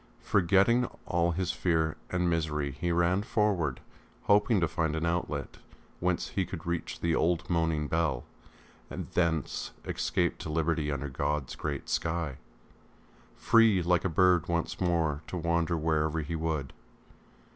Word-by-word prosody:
Forgetting 100 +6 +3 0.2
all 85 0 +1
his 90 +1 -1
fear 80 -3 0
and 90 -1 0
misery 75 -4 0
he 85 +6 -2
ran 85 +3 +2
forward, 105 - 0 0.4
hoping 105 +1 +4
to 85 - +2
find 80 -1 -1
an 80 +1 -1
outlet 85 +1 -2 0.4
whence 90 0 0
he 95 - 0
could 85 -2 -7
reach 85 -1 -3
the 85 -1 +1
old 85 +1 +1
moaning 80 -3 +1
bell, 75 -6 0 0.7
and - - -6
thence 80 -4 -1
escape - - -1
to - - -6
liberty 80 -1 0
under 70 0 -3
God's 70 0 -2
great 70 -3 -4
sky, 80 -5 -1 1.0
free 110 -5 +4
like 90 0 +2
a 95 - +1
bird 90 0 +3
once 85 +1 -2
more 80 -4 +1
to 90 - -4
wander 85 0 0
wherever 80 0 0
he 75 +2 -4
would. 80 -4 -2
85 Hz, 145 wpm, -29 LUFS, 80-90 Hz, 1.0 s, hoping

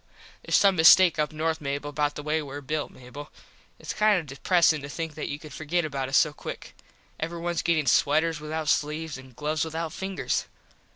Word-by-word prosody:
Theres - - 0
some 195 -2 +4
mistake 165 +1 +7
up 150 -1 0
north 160 +1 -2
Mable 145 +1 -3
about 145 0 -1
the 150 - -6
way 155 +1 0
were 145 -1 -7
built, 150 +2 -3
Mable. 130 +4 -11 0.5
Its - - -6
kind 210 -2 +3
of 165 - -7
depresin 155 +3 +2
to 140 - -8
think 160 +1 -5
that 150 - -5
you 145 - -3
could 150 -1 -12
forget 160 +3 -1
about 135 -3 -3
us 135 - +3
so 150 - +3
quick. - - -8 0.5
Everyones 170 +1 -2
gettin 165 -3 +1
sweters 155 +5 +2
without 155 +1 -4
sleeves 150 0 -1
and 130 -2 -15
gloves 150 +2 -1
without 160 0 -4
fingers. 190 -10 -2
155 Hz, 190 wpm, -26 LUFS, 145-165 Hz, 0.5 s, mistake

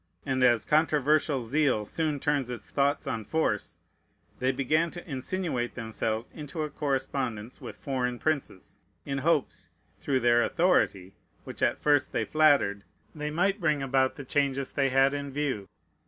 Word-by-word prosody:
And 130 -2 0
as 120 -4 +4
controversial 150 -2 +2
zeal 125 -3 +1
soon 155 +4 -2
turns 145 -3 0
its 120 -4 -7
thoughts 140 +1 +1
on 110 -2 -3
force, 115 -7 -1 0.6
they 130 +1 +2
began 150 +6 +1
to 175 +2 -10
insinuate 135 -3 -3
themselves 110 -1 -3
into 155 +1 -5
a 150 - -4
correspondence 130 -5 -3
with - - -8
foreign 125 -3 -2
princes, 140 -10 -3 0.3
in 135 -1 -2
hopes, 150 -1 0 0.3
through 130 -2 0
their 120 0 +4
authority, 100 - +1 0.3
which - - -9
at - - +2
first 145 -2 +2
they - - 0
flattered, 140 -11 +3 0.3
they 150 -1 -4
might 195 +6 0
bring 150 -4 +1
about 130 0 +1
the 140 - -8
changes 140 -1 0
they 135 -1 +2
had 135 +1 +4
in 140 0 -4
view. 135 -9 -3
140 Hz, 155 wpm, -28 LUFS, 125-150 Hz, 0.6 s, as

